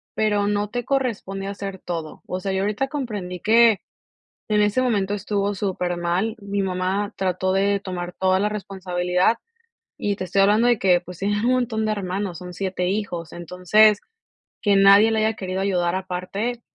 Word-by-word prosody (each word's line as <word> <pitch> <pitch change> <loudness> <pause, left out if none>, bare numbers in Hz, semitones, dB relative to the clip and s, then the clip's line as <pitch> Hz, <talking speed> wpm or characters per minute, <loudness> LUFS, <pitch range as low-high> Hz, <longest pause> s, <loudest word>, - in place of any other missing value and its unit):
pero 210 -2 +1
no 205 0 0
te 245 +2 -3
corresponde 225 -8 -2
hacer 200 -1 -5
todo. 165 -3 -6
O 185 - -4
sea, 195 +1 -3
yo 190 - 0
ahorita 210 +7 0
comprendí 210 -11 -4
que 225 +1 +5 0.7
en 210 -1 +2
ese 210 +5 +2
momento 205 -5 0
estuvo 205 0 -1
supermal. 180 +2 -1
Mi 200 0 -2
mamá 190 +2 -1
trató 185 0 0
de 200 +1 +2
tomar 180 -2 -5
toda 190 0 +2
la 210 +1 +1
responsabilidad, 185 0 0 0.6
y 205 -1 -1
te 185 - -4
estoy 195 +2 +2
hablando 210 +4 +4
de 240 -1 +4
que, 180 -3 +3
pues, 180 -1 -11
tienen 205 +3 0
un 250 - +3
montón 235 -3 0
de 215 - 0
hermanos, 190 -2 -3
son 180 -1 -8
7 180 0 -2
hijos. 185 -5 -3
Entonces, 180 +5 +3 0.6
que 205 -2 +3
nadie 200 +2 +7
le 225 - 0
haya 220 - +1
querido 185 -2 -4
ayudar 180 -3 +1
aparte, 190 +6 -3
195 Hz, 170 wpm, -23 LUFS, 185-210 Hz, 0.7 s, nadie